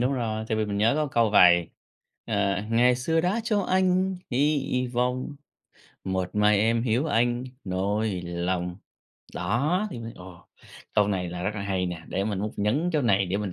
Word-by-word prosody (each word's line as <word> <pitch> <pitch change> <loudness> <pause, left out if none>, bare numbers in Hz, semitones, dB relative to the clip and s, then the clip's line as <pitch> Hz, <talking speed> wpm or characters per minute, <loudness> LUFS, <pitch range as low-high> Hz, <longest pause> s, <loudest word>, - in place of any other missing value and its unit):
đúng 125 +3 +1
rồi. 110 -4 -2
Tại 110 - 0
vì 110 - +1
mình 100 -1 -3
nhớ 110 +3 +3
có 155 - +1
câu 115 -5 +2
vậy, 85 -4 +5 0.6
ờ, 100 -2 0
ngày 120 +2 +4
xưa 160 +6 +1
đã 185 +7 0
cho 215 -3 +1
anh 185 0 +1
hy 135 -1 +1
vọng, 125 +3 -1 0.7
một 95 -1 -2
mai 105 0 +4
em 115 +2 +2
hiểu 125 +5 +1
anh 120 -2 +1 0.2
nỗi 95 +1 -1
lòng. 90 +1 -2 0.6
Đó, 140 - 0
thì 120 - -6
mới 115 0 -7
ồ, 90 -2 -13 0.5
câu 105 -1 +3
này 90 -3 -1
là 90 0 -5
rất 95 - 0
là 100 - -4
hay 95 -2 -1
nè, 85 -2 -5
để 95 - -1
mình 105 -2 -2
múc 105 +2 -3
nhấn 135 +13 +1
chỗ 150 -2 +1
này, 100 -5 +2
để 90 +2 -1
mình 100 -2 -3
110 Hz, 190 wpm, -26 LUFS, 95-130 Hz, 0.7 s, vậy